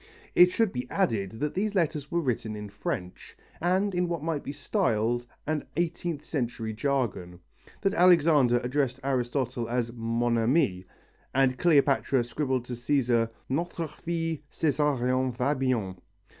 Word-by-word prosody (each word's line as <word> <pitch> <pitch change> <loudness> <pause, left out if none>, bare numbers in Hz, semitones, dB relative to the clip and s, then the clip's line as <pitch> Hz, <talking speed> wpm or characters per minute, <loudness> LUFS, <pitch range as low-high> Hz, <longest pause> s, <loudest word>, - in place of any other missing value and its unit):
It 180 0 +7
should 220 +1 +1
be 125 -1 -4
added 100 -3 0
that 145 +7 -3
the 205 +3 0
letters 160 -7 -1
were 170 - 0
written 115 -6 -2
in 105 -1 -7
French 95 -2 -5 0.2
and 190 +4 +1
in 180 0 +1
what 170 -3 -3
might 160 -3 -1
be - - -4
styled 120 - 0 0.2
an 155 -1 -1
eighteenth 170 -2 -2
century 120 -6 -3
jargon, 115 -8 -2 0.4
that 195 -1 +1
Alexander 160 - +5
addressed 130 0 0
Aristotle 125 -2 -1
as 120 -1 -1
Mon 115 0 0
Ami 115 - +2 0.5
and 135 -1 +3
Cleopatra 140 -5 +3
scribbled 130 0 -2
to 125 - -6
Cæsar: 120 -2 +1 0.2
Notre 165 +3 -2
fils 165 -1 -3
Cesarion 130 -4 +1
va 130 +4 +1
bien. 125 -9 -1
135 Hz, 140 wpm, -28 LUFS, 120-160 Hz, 0.5 s, It